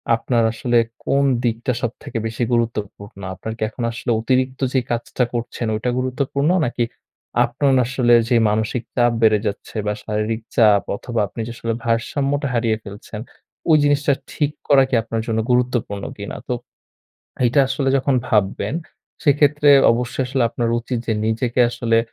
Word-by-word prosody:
আপনার 115 0 0
আসলে 120 +1 +1 0.3
কোন 140 0 +2 0.2
দিকটা 120 +2 0
সবথেকে 120 0 -4
বেশি 115 +2 -3
গুরুত্বপূর্ণ? 105 -4 -3
আপনার 110 +4 -6
কি - - -20
এখন 120 +2 -6
আসলে 115 +1 -6
অতিরিক্ত 130 +2 0
যে 130 - +4
কাজটা 120 +2 -1
করছেন 120 0 -3
ওইটা 110 +3 -1
গুরুত্বপূর্ণ 140 +3 -1 0.2
নাকি, 120 0 -1 0.6
আপনার 135 +3 +1
আসলে 125 -1 +2 0.2
যে 125 - +3
মানসিক 110 +3 -1
চাপ 120 -1 +3
বেড়ে 110 -2 +5
যাচ্ছে 100 +3 -6
বা 105 - 0
শারীরিক 110 +1 -2
চাপ 105 -3 +5
অথবা 120 +2 -4
আপনি 105 - -11 0.2
আসলে 115 0 -2
ভারসাম্যটা 140 +5 0
হারিয়ে 115 -2 +1
ফেলছেন, 105 +1 -9 0.5
ওই 155 - +7
জিনিসটা 145 0 +3 0.2
ঠিক 145 -1 0 0.2
করা 140 -2 +6
কি 130 - +1
আপনার 115 0 -3
জন্য 110 -1 0
গুরুত্বপূর্ণ 120 -5 0
কিনা? 100 0 -6
তো - - 0 0.9
এইটা 120 +4 +3
আসলে 135 0 0
যখন 135 0 +1
ভাববেন 105 +5 0 0.5
সেক্ষেত্রে 145 0 +4 0.2
অবশ্যই 120 +2 -1
আসলে 130 -1 +1
আপনার 115 0 -1
উচিত 120 +1 -3
যে 115 - +2
নিজেকে 115 +3 -1
আসলে 115 -1 +1
120 Hz, 150 wpm, -20 LUFS, 110-130 Hz, 0.9 s, ওই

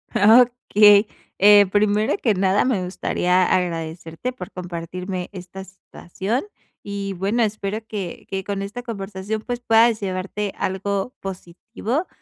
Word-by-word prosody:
Okey. 215 -2 +5 0.3
Eh, 205 0 +7
primero 210 0 +2
que 220 - +1
nada, 195 +3 +2
me 215 -8 0
gustaría 180 0 +1
agradecerte 165 +5 -2
por 190 -4 -9
compartirme 180 +1 -6
esta 190 0 -9
situación. 190 - -5 0.4
Y 200 -1 -4
bueno, 200 +6 0
espero 215 0 -3
que 200 -6 -6
que 190 -1 -3
con 200 0 -3
esta 205 +5 -6
conversación, 205 -1 -5
pues, 245 0 -4
puedas 225 -1 +4
llevarte 195 +1 -3
algo 195 +4 -2
positivo, 210 - -5
200 Hz, 125 wpm, -22 LUFS, 185-215 Hz, 0.4 s, Eh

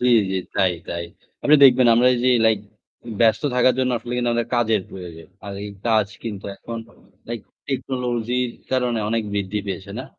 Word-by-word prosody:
জী, 125 - +2 0.2
জী। 95 - -1 0.2
তাই, 95 -2 +3 0.2
তাই। 85 0 -3 0.4
আপনি 150 - +5
দেখবেন 130 -1 +7
আমরা 120 +2 +5 0.2
যে - - +5 0.2
লাইক 110 -2 +3 0.6
ব্যস্ত 115 +3 +4
থাকার 125 0 +4
জন্য 130 -1 +1
আসলে 120 +2 -7
কিন্তু 120 -1 0
আমাদের 120 0 -1
কাজের 110 -4 +2
প্রয়োজন। 85 -3 -9 0.2
আর 100 - -6
এই 105 - -6 0.2
কাজ 110 -3 +3 0.2
কিন্তু 105 -4 -6
এখন 115 -1 -7 0.5
লাইক 120 -1 -4 0.3
টেকনোলজির 125 -2 -1 0.2
কারণে 125 -3 +1
অনেক 115 +1 0
বৃদ্ধি 100 +1 -1
পেয়েছে 95 +1 -5
না? 130 - -5
115 Hz, 170 wpm, -22 LUFS, 100-125 Hz, 0.6 s, দেখবেন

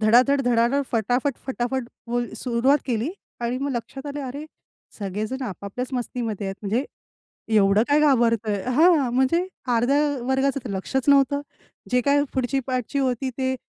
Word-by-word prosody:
धडाधड-धडाधड, 245 +2 +4
फटाफट-फटाफट 245 +2 -1 0.2
बोल 240 0 -1
सुरुवात 255 +3 +2
केली 240 +3 -1 0.3
आणि 240 +2 -1
मग 280 +1 -2
लक्षात 245 +4 -5
आलं, 290 0 -4
"अरे, 280 +4 -6 0.5
सगळेजण 215 +6 -3
आपापल्याच 205 +3 -5
मस्तीमध्ये 235 -5 -3
आहेत. 195 - -3
म्हणजे, 220 +6 0 0.7
एवढं 200 +1 +5
काय 290 +1 +4
घाबरतोय? 230 -8 +2
हां, 315 -4 +5
म्हणजे 265 +8 +2 0.3
अर्ध्या 250 +5 +3 0.3
वर्गाचं 265 -1 0
लक्षच 245 +8 -1
नव्हतं. 280 0 +4 0.5
जे 250 0 +3
काही 285 +3 +3
पुढची 260 +1 0
पाठची 255 +2 -1
होती 260 -1 0
ते 260 -1 0
250 Hz, 130 wpm, -24 LUFS, 230-275 Hz, 0.7 s, एवढं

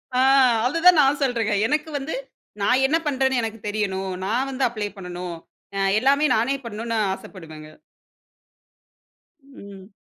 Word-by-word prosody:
ஆ - - +2 0.5
அதுதான் 330 +5 +5
நான் 275 +1 +2
சொல்றங்க. 230 -5 0
எனக்கு 300 +4 -1
வந்து 275 +3 -5 0.5
நான் 250 +6 +3
என்ன 310 +4 +2
பண்றேனு 265 -2 +1
எனக்குத் 225 -2 -6
தெரியனும். 195 -3 -2
நான் 240 +7 0
வந்து 265 0 -2
அப்ளை 215 -3 -4
பண்ணணும். 180 -2 -6 0.4
அ - - -2 0.2
எல்லாமே 280 +5 +3
நானே 235 +5 +1
பண்ணணும் 230 +1 -4 0.2
ஆசைப்படுவேன்ங்க. 160 -5 -11 1.7
ம். 200 -8 -13
230 Hz, 125 wpm, -23 LUFS, 195-270 Hz, 1.7 s, அதுதான்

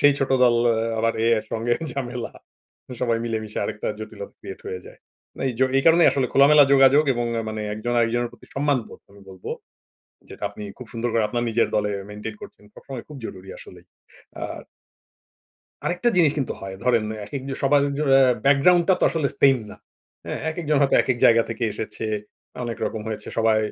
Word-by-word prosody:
সেই 145 0 +6
ছোট 135 - -1
দল 120 - +4 0.2
এ - - +1 0.2
আবার 115 +1 +2
এ, - - +2
এর 110 - -6
সঙ্গে 115 +2 -1 0.2
ঝামেলা। 125 -2 -5 0.7
সবাই 115 -2 +1
মিলেমিশে 110 -2 -3
আরেকটা 105 - -4
জটিলতা 110 -2 -9
ক্রিয়েট 95 - -9
হয়ে 90 0 -5
যায়। - - -14 0.4
না - - -6
এই - - -2
জ - - -6 0.2
এই 135 - +3
কারণেই 165 +1 +6
আসলে 135 -2 0
খোলামেলা 145 +2 +7
যোগাযোগ, 135 +2 +6
এবং 120 0 -1 0.2
মানে 110 0 -4
একজন 115 +3 -3
আরেকজনের 120 +1 +1
প্রতি - - -17
সম্মানবোধ 140 -4 -1
আমি 100 0 -17
বলব। 95 -1 -14 0.9
যেটা - - -10
আপনি 105 +1 -10
খুব 125 -3 -10
সুন্দর 120 +1 -2
করে 115 -2 +2
আপনার 120 +2 -2
নিজের 115 +1 +2
দলে 105 -1 +1 0.2
মেইনটেইন 105 +1 -7
করছেন। - - -12
সবসময় 130 -4 -9
খুব 150 - -9
জরুরি 95 -1 -9
আসলেই। - - -13 0.6
আর - - -6 1.2
আরেকটা 180 +7 0
জিনিস 160 -5 +5
কিন্তু 135 - -1
হয়। 95 0 -6
ধরেন 120 -3 +3 0.2
এক - - -14
এক - - -10
যে 135 - -3
সবার 140 +1 +4 0.2
য - - -1 0.4
ব্যাকগ্রাউন্ড 170 +6 +5
টা 190 - +6
তো - - +3
আসলে 155 -4 0
সেইম 135 -1 +6
না। - - -11 0.5
হ্যাঁ? - - -4
একেকজন 155 -2 -1
হয়তো 140 - +3
একেক 130 - 0
জায়গা 115 0 +6
থেকে 115 +1 -3
এসেছে। 110 +1 -5 0.6
অনেক 120 -1 -4
রকম 110 - -4
হয়েছে 105 -1 -5
সবাই 110 -1 +3
120 Hz, 185 wpm, -23 LUFS, 110-140 Hz, 1.2 s, খোলামেলা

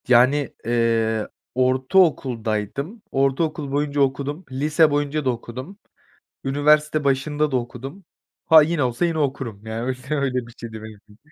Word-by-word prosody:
Yani, 130 +3 +4
eee, 115 -2 +1 0.3
ortaokuldaydım, 130 - +1
ortaokul 140 +2 0
boyunca 145 0 0
okudum, 140 +5 -1
lise 150 +4 +3
boyunca 145 0 -1
da - - +3
okudum, 125 - -6 0.7
üniversite 150 +2 +2
başında 145 +2 0
da 130 - +2
okudum. 130 +9 -7 0.4
Ha, 160 -1 +8
yine 155 -1 0
olsa 125 +6 0
yine 165 -2 -1
okurum, 130 -7 -3
yani 110 +1 -4
öy 130 0 -1 0.2
öyle 130 -5 -1
bir 120 - -14
şeydi 110 -2 -8
benim 110 -1 -10
için 105 0 -22
135 Hz, 140 wpm, -22 LUFS, 120-150 Hz, 0.7 s, Ha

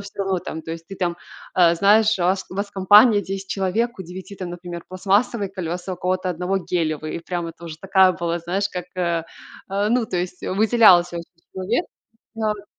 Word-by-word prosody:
всё 200 0 -5
равно 190 -1 0
там, 160 -2 -7
то 160 - -8
есть 165 0 -7
ты 195 - -9
там, 175 -1 -1 0.4
э, 170 -2 +5
знаешь, 210 +3 +4
у - - -1
вас, 190 +2 +1
у - - -8
вас 200 +1 -2
в - - -26
компании 205 +3 +6
10 195 0 -6
человек, 210 +4 -1
у - - -5
9 185 +3 -9
там, 185 -2 -5
например, 175 -1 -7
пластмассовые 200 +3 0
колеса, 180 0 -4
у - - -5
кого-то 185 +1 -1
одного 180 +3 -1
гелевые. 155 -4 -2
И - - -4
прямо 170 -1 -4
тоже 165 -1 -9
такая 190 -1 +4
была, 170 0 -2
знаешь, 185 +4 -2
как, 180 -1 -5
э, 170 -2 0 0.5
э, 200 +1 0
ну, 240 -2 +2
то 180 - -3
есть 180 +1 -4
выделялся 190 -4 +4
очень 170 - -6 0.3
человек. 205 - -1 0.5
Ам. 210 -2 -2
185 Hz, 200 wpm, -22 LUFS, 175-200 Hz, 0.5 s, компании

